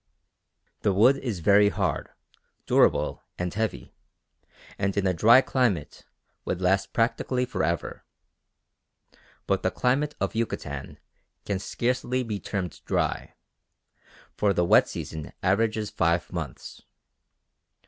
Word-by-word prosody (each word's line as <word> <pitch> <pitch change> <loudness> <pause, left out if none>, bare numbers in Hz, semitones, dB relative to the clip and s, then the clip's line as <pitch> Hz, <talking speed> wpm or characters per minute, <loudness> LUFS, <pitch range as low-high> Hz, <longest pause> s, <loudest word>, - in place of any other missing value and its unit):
The 100 - +2
wood 120 +8 +5
is 115 -10 -4
very 100 +3 +5
hard, 95 -8 -2 0.6
durable, - - +2 0.2
and 90 -1 -3
heavy, 110 +1 -3 0.9
and 100 0 -1
in 100 - +1
a 95 - +2
dry 115 +9 +6
climate 115 - -1 0.4
would - - -3
last 95 +1 +1
practically 125 +2 0
for 95 -6 -3
ever. 85 -1 -2 1.4
But - - 0
the - - +1
climate 140 +4 0
of 95 - -1
Yucatan 75 - -4 0.5
can 100 -2 -1
scarcely 125 +4 -1
be 105 -4 -4
termed 90 -8 -4
dry; - - -1 1.0
for 100 -1 +2
the 85 - +2
wet - - +5
season 80 -2 -6
averages 105 +2 +1
five 85 +1 0
months. 80 -7 -6
100 Hz, 115 wpm, -26 LUFS, 90-115 Hz, 1.4 s, dry